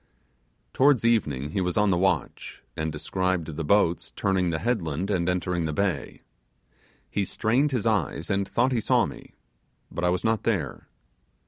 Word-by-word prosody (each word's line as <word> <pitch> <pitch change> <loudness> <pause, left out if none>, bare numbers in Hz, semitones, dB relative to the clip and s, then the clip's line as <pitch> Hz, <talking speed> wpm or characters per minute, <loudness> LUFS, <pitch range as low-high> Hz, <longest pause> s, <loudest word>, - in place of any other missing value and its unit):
Towards 135 -3 +4
evening 75 - +1
he 95 - -1
was 90 +1 -1
on 105 -1 +3
the - - +3
watch, 90 -5 -1
and 80 0 -2
descried 90 +3 -1
the 80 0 -5
boats 85 0 +2
turning 95 -2 +1
the 80 - -1
headland 95 - -1
and 90 -2 +1
entering 90 -2 -1
the 80 - -2
bay. 100 +1 -2 0.8
He 100 - -1
strained 120 +9 +1
his 125 -5 -1
eyes, 105 -7 0
and 100 0 0
thought 125 +3 +1
he 120 -3 +1
saw - - +3
me; - - -10 0.6
but 85 - -4
I 90 - +3
was 90 +1 0
not 110 -1 +1
there. 95 - -2
95 Hz, 165 wpm, -26 LUFS, 85-110 Hz, 0.8 s, Towards